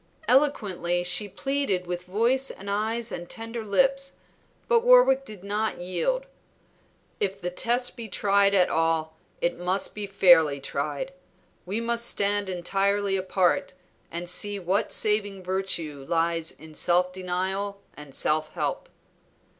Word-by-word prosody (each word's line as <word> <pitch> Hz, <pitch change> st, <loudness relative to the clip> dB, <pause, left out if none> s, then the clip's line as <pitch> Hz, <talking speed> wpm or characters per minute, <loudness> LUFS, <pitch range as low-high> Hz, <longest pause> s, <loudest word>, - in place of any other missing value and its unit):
Eloquently 195 Hz, -, +2 dB
she 200 Hz, +3 st, +1 dB
pleaded 205 Hz, -4 st, -1 dB
with 175 Hz, 0 st, -4 dB
voice 235 Hz, +8 st, +1 dB
and 200 Hz, +1 st, -7 dB
eyes 220 Hz, +3 st, -1 dB
and 175 Hz, 0 st, -6 dB
tender 225 Hz, 0 st, -5 dB
lips, 270 Hz, +6 st, +1 dB, 0.5 s
but 475 Hz, -1 st, +5 dB
Warwick -, -, +6 dB
did 210 Hz, -6 st, -10 dB
not 210 Hz, +2 st, -1 dB
yield. 185 Hz, -, -1 dB, 0.9 s
"If 195 Hz, -1 st, -1 dB
the 180 Hz, -2 st, -3 dB
test 240 Hz, +6 st, -1 dB
be 230 Hz, -3 st, -6 dB
tried 200 Hz, 0 st, +3 dB
at 180 Hz, -2 st, +5 dB
all 160 Hz, -1 st, 0 dB, 0.3 s
it 175 Hz, 0 st, 0 dB
must 185 Hz, +2 st, 0 dB
be 210 Hz, -1 st, -4 dB
fairly 165 Hz, -7 st, +5 dB
tried. -, -, -4 dB, 0.5 s
We 200 Hz, +4 st, -2 dB
must 235 Hz, 0 st, +1 dB
stand 205 Hz, -2 st, 0 dB
entirely 195 Hz, +2 st, 0 dB
apart 185 Hz, -1 st, +1 dB, 0.4 s
and 170 Hz, +1 st, -5 dB
see 205 Hz, +3 st, +1 dB
what 195 Hz, +3 st, 0 dB
saving 205 Hz, -3 st, 0 dB
virtue 175 Hz, -6 st, -2 dB
lies 165 Hz, -1 st, 0 dB
in 155 Hz, +2 st, -13 dB
self 180 Hz, +3 st, +2 dB
denial 190 Hz, +2 st, -3 dB, 0.2 s
and 150 Hz, -2 st, -11 dB
self 155 Hz, 0 st, 0 dB
help." -, -, -3 dB
195 Hz, 135 wpm, -26 LUFS, 175-220 Hz, 0.9 s, Warwick